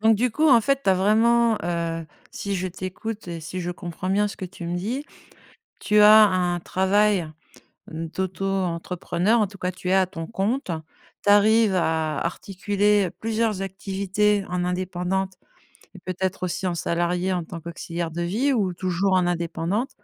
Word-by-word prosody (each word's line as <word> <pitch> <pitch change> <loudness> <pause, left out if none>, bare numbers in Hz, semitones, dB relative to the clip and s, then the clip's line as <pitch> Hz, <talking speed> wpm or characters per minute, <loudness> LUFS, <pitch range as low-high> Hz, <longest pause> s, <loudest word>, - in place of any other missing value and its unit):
Donc 220 +1 +5
du 245 +4 +1
coup 310 +8 +2
en 245 -5 +7
fait, 275 +3 0
tu - - +4
as - - +5
vraiment, 225 +4 +3
heu 165 -1 -2 0.2
si 200 -1 -4
je 185 0 -2
t'écoute 185 +4 -6
et 170 -1 -5
si 180 +4 -5
je 175 0 -3
comprends 175 +1 -5
bien 205 +1 +2
ce - - -9
que - - -6
tu 180 -2 -8
me 175 - -2
dis, 235 +11 -3 0.8
tu 210 0 +3
as 215 +1 +9
un 180 -2 0
travail 190 -1 +2 0.6
d'auto-entrepreneur, 180 +3 -1
en 210 - +3
tout 195 0 -13
cas 180 0 -2
tu 180 0 -7
es - - +2
à 190 -1 +4
ton 165 -3 -7
compte, 225 +4 -2 0.5
tu 205 - +4
arrives 210 0 +5
à 160 -4 0
articuler 200 +1 0
plusieurs 220 -3 -1
activités 195 +1 0
en 180 0 -1
indépendante 185 +1 -2 0.6
et - - -10
peut-être 185 +1 -3
aussi 185 +2 -2
en 175 - 0
salariée 175 +2 -1
en 175 -2 -1
tant 170 0 -8
qu'auxiliaire 170 0 -5
de 170 +2 -4
vie, 235 +11 +1
ou 200 -7 +1
toujours 185 +2 -1
en 180 -1 +3
indépendante 175 +7 -1
190 Hz, 170 wpm, -24 LUFS, 175-210 Hz, 0.8 s, as